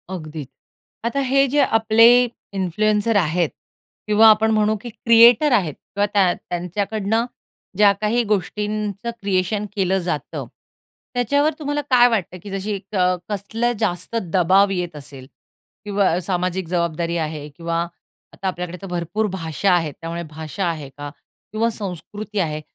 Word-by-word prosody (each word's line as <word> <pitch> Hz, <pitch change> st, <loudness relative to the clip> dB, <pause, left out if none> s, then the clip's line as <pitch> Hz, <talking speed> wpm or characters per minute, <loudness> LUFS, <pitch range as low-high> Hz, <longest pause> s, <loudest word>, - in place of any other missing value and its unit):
अगदीच. 155 Hz, -5 st, -7 dB, 0.6 s
आता 240 Hz, +4 st, -1 dB
हे 275 Hz, +1 st, +4 dB
जे 290 Hz, -, +4 dB, 0.2 s
आपले 225 Hz, +1 st, +5 dB, 0.5 s
इन्फ्लुएन्सर 210 Hz, +4 st, +1 dB
आहेत 170 Hz, -2 st, +1 dB, 0.6 s
किंवा 215 Hz, +1 st, +6 dB
आपण 220 Hz, +1 st, +1 dB
म्हणू, 215 Hz, 0 st, +2 dB
की 240 Hz, -, -7 dB
क्रिएटर 235 Hz, +5 st, +5 dB
आहेत 180 Hz, -, +2 dB
किंवा 200 Hz, +1 st, -2 dB
त्या 190 Hz, -4 st, +4 dB
त्यांच्याकडनं 200 Hz, +5 st, -2 dB, 0.5 s
ज्या 205 Hz, -1 st, +6 dB
काही 230 Hz, +3 st, +1 dB
गोष्टींचं 210 Hz, +2 st, -2 dB
क्रिएशन 200 Hz, +1 st, 0 dB
केलं 190 Hz, -1 st, +1 dB
जातं, 155 Hz, -4 st, -3 dB, 0.7 s
त्याच्यावर 285 Hz, +5 st, +2 dB
तुम्हाला 295 Hz, -1 st, -2 dB
काय 245 Hz, -2 st, +6 dB
वाटतं, 185 Hz, -5 st, -2 dB
की 205 Hz, -, -8 dB
जशी 195 Hz, +2 st, -3 dB
एक 200 Hz, +2 st, -9 dB, 0.3 s
कसलं 220 Hz, +4 st, -1 dB
जास्त 180 Hz, 0 st, -2 dB, 0.2 s
दबाव 190 Hz, +3 st, +4 dB
येत 175 Hz, -3 st, -3 dB
असेल? 140 Hz, -3 st, -10 dB, 0.6 s
किंवा 200 Hz, -4 st, +1 dB
सामाजिक 180 Hz, 0 st, -2 dB
जबाबदारी 170 Hz, -1 st, -1 dB
आहे 150 Hz, -1 st, -6 dB
किंवा 165 Hz, +2 st, -4 dB, 0.6 s
आता 195 Hz, -, -5 dB
आपल्याकडे 180 Hz, -1 st, -4 dB
तर 195 Hz, -, -7 dB
भरपूर 175 Hz, +5 st, -2 dB
भाषा 165 Hz, +3 st, 0 dB
आहेत. 165 Hz, -4 st, +1 dB
त्यामुळे 170 Hz, +1 st, -4 dB
भाषा 160 Hz, +5 st, -4 dB
आहे 155 Hz, -4 st, -5 dB
का? 145 Hz, 0 st, -6 dB, 0.4 s
किंवा 225 Hz, +2 st, +1 dB
संस्कृती 205 Hz, +3 st, -5 dB
आहे. 155 Hz, -4 st, -1 dB
195 Hz, 135 wpm, -21 LUFS, 170-215 Hz, 0.7 s, किंवा